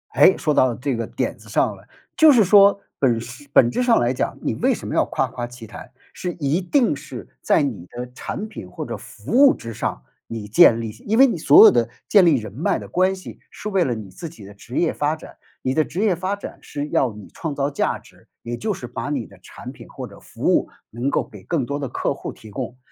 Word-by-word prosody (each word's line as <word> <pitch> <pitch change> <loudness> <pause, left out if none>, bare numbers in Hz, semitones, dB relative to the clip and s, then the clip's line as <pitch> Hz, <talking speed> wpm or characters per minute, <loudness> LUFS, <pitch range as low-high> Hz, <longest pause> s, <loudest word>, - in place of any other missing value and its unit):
诶， 190 - +6
说 150 - 0
到 130 -3 +3
这 130 +1 -2
个 115 -1 -3
点 - - -3
子 - - -16
上 - - +1
了， - - -18 0.3
就 315 -1 +7
是 235 -5 +5
说 200 +1 +6 0.2
本 120 -4 +2
事 130 +5 -10
本 120 -3 +5
质 250 - -1
上 240 -2 +4
来 120 +1 +1
讲， 125 - -2
你 - - -1
为 - - +2
什 - - -6
么 - - -4
要 - - +3
夸 - - -1
夸 120 -1 -5
其 125 -1 -11
谈， 115 +3 -11 0.2
是 180 -1 -4
一 155 +2 -1
定 235 - +2
是 140 -3 -9
在 155 - +3
你 105 -11 -4
的 125 +1 -7
产 210 +10 -5
品 110 - -10
或 90 - -6
者 - - -5
服 105 - -10
务 270 +3 +7
之 115 -1 -8
上， 65 - -4 0.2
你 110 -2 -6
建 110 +2 +6
立 110 -1 -4 0.2
因 220 +3 +1
为 270 - +8
你 255 - 0
所 405 +6 +8
有 440 - +9
的 - - +1 0.2
建 200 -4 +6
立 160 - +5
人 110 -5 -4
脉 145 +8 0
的 - - -8
关 185 +1 +1
系 185 - -11
是 210 - -7
为 195 -3 +2
了 125 -6 -1
你 105 -4 -8
自 165 - -8
己 150 -11 -13
的 100 - -12
职 115 +5 -9
业 170 - +2
发 150 +1 0
展， 155 - -13 0.3
你 130 - 0
的 155 - +3
职 165 +6 -4
业 210 -4 +2
发 185 +4 -2
展 200 - -9
是 145 +1 -5
要 130 -5 +1
你 105 -1 -12
创 155 -4 -4
造 140 +1 -1
价 145 - -1
值， - - -21 0.2
也 120 0 -4
就 215 - -2
是 170 -10 -5
把 125 +4 -5
你 135 -6 -2
的 - - -17
产 - - -10
品 - - -14
或 - - -7
者 - - -15
服 - - -1
务 - - +1 0.2
能 120 +5 -2
够 - - -1
给 - - -13
更 155 -7 -1
多 140 +3 -3
的 135 - -4
客 - - -1
户 - - -7
提 110 - -14
供。 125 +2 -5
140 Hz, 275 characters per minute, -22 LUFS, 120-185 Hz, 0.3 s, 有